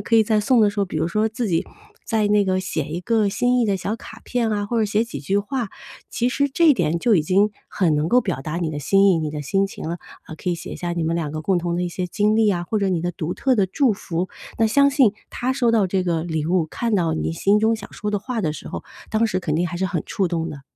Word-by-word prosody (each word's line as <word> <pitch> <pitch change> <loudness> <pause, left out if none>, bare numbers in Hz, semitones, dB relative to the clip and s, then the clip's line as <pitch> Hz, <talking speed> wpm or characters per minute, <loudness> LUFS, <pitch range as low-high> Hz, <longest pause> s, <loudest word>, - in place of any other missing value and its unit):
可 220 - -1
以 220 - +7
在 215 0 +2
送 235 +3 +3
的 210 -1 +4
时 205 - -9
候， 200 - +3
比 165 - -5
如 160 +2 0
说 215 +4 +1
自 230 +1 -3
己 165 -4 +1 0.4
在 220 -2 +1
那 205 -1 +3
个 185 0 +1
写 155 -5 -3
一 165 +3 -4
个 220 +1 +1
心 245 +5 +1
意 - - +3
的 200 -3 +1
小 200 +4 -3
卡 220 0 -11
片 240 -3 0
啊， 205 -1 -1
或 235 - -2
者 - - +3
写 210 +2 +1
几 145 -12 -7
句 195 +8 0
话， 230 +2 -2 0.4
其 245 - 0
实 280 +3 +1
这 320 +3 +4
一 - - +5
点 170 -3 0
就 230 +4 +3
已 160 - +3
经 200 +6 +2 0.2
很 170 -6 +1
能 150 +2 0
够 250 +4 +5
表 135 - -3
达 155 +3 -4
你 170 -3 -1
的 145 -1 -4
心 195 +7 +4
意， 165 - +2
你 155 -1 -2
的 150 - -5
心 195 +7 +1
情 160 - -7
了。 170 +1 -3 0.3
啊， 160 - -9
可 180 - -3
以 - - +1
写 - - -8
一 - - -6
下 175 -1 -3
你 170 -1 -1
们 165 +1 0
2 160 -3 -2
个 155 - -4
共 180 +3 +1
同 170 0 -2
的 180 - -1
一 - - -2
些 180 +1 -3
经 210 +3 +1
历 220 -1 +4
啊， 175 -3 -1
或 215 - 0
者 195 - +1
你 180 -3 0
的 175 +1 -2
独 165 +1 -3
特 265 -2 +2
的 200 -5 +2
祝 245 +6 +2
福， 185 -2 -3 0.3
那 225 - +4
相 280 +6 +4
信 270 -7 +4 0.2
她 250 +2 -1
收 245 -3 +2
到 215 -4 +3
这 185 +1 0
个 170 -2 -1
礼 160 -3 -2
物， 175 -2 +1
看 230 +6 -2
到 165 -3 +1
你 160 - -2
心 200 +5 +2
中 225 +1 +3
想 200 - -11
说 210 0 -4
的 205 - 0
话 230 +3 -3
的 160 -6 0
时 - - -9
候， - - -5 0.3
当 220 +1 +2
时 210 - 0
肯 160 -5 -2
定 170 +3 +1
还 175 - -5
是 190 +2 0
很 180 -5 -2
触 195 - -1
动 165 -1 -2
的。 140 -2 -9
195 Hz, 320 characters per minute, -22 LUFS, 170-220 Hz, 0.4 s, 以